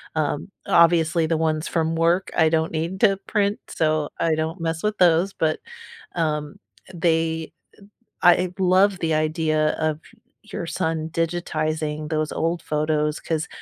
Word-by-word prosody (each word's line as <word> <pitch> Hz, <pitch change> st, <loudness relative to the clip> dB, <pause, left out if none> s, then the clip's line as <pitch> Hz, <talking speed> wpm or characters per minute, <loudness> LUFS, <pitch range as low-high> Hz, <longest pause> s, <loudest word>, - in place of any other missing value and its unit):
Um, 150 Hz, +3 st, -1 dB, 0.2 s
obviously, 170 Hz, -1 st, +4 dB
the 165 Hz, +1 st, 0 dB
ones 155 Hz, -1 st, 0 dB
from 165 Hz, -1 st, 0 dB
work, 170 Hz, +3 st, +2 dB
I 160 Hz, -, +5 dB
don't 160 Hz, 0 st, 0 dB
need 165 Hz, +4 st, -3 dB
to 195 Hz, -3 st, +4 dB
print, 205 Hz, -1 st, 0 dB
so, 155 Hz, -2 st, 0 dB
I 165 Hz, -1 st, +2 dB
don't 160 Hz, +3 st, -3 dB
mess 165 Hz, 0 st, -2 dB
with 210 Hz, 0 st, -1 dB
those, 180 Hz, +2 st, +3 dB
but, 155 Hz, -1 st, 0 dB, 0.6 s
um, 150 Hz, -3 st, -2 dB, 0.4 s
they 165 Hz, -2 st, 0 dB, 0.7 s
uh, 175 Hz, -1 st, +7 dB
I 180 Hz, 0 st, -2 dB
love 190 Hz, +1 st, +3 dB
the 160 Hz, -1 st, 0 dB
idea 155 Hz, 0 st, +1 dB
of 155 Hz, -1 st, 0 dB, 0.4 s
your 205 Hz, -5 st, -6 dB
son 160 Hz, -3 st, -2 dB
digitizing 155 Hz, -2 st, -2 dB
those 155 Hz, -1 st, -1 dB
old 165 Hz, +1 st, -1 dB
photos, 150 Hz, 0 st, -1 dB
'cause 160 Hz, -1 st, -2 dB
160 Hz, 145 wpm, -23 LUFS, 155-175 Hz, 0.7 s, uh